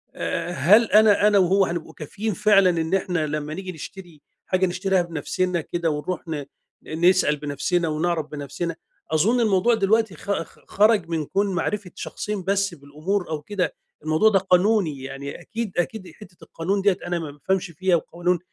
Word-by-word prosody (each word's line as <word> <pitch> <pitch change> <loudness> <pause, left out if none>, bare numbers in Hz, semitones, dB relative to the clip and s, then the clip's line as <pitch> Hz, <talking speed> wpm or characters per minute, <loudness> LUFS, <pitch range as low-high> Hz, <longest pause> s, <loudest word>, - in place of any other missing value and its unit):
آآ 175 - -3
هل 185 - +5
أنا 210 -1 +6
أنا 210 -1 +4
وهو 190 +2 +4
هنبقى 170 -2 -5
كافِيين 205 +8 -4
فعلًا 200 -1 +4
إن 165 0 -1
إحنا 180 -5 0
لما 150 0 -3
نيّجي 185 +1 -5
نشتري 175 -1 -10 0.2
حاجة 185 0 +1
نشتريها 185 +1 +1
بنفسنا 175 +2 -2
كده 170 +1 -2
ونروح 150 +4 -3
ن 150 -3 -4 0.4
ن 160 +3 -2
نسأل 180 -5 +2
بنفسنا 150 +4 -1
ونعرف 160 +1 -1
بنفسنا؟ 150 +3 -5 0.4
أظن 205 +11 +3
الموضوع 220 +1 +3
دلوقتي 220 -1 +1
خ 200 - -5
خ - - -21
خرج 210 -4 +3
من 160 -2 -1
كون 195 +3 0
معرفة 190 +2 -2
شخصين 210 -3 -5
بس 195 0 0
بالأمور 155 +7 -3
أو 155 -2 -3
كده، 190 +3 -2 0.3
الموضوع 155 +8 +4
ده 195 -2 +3
قانوني 185 -5 +2
يعني 135 +1 -7
أكيد 230 -2 -5
أكيد 185 0 -2
حتة 185 -5 -15
القانون 195 +5 -2
ديّة 195 -2 +3
أنا 175 -1 -1
ما 155 -3 -6
بافهمش 175 +5 -2
فيها 185 +2 +1
وقوانين- 175 +2 -1
180 Hz, 170 wpm, -23 LUFS, 160-200 Hz, 0.4 s, أنا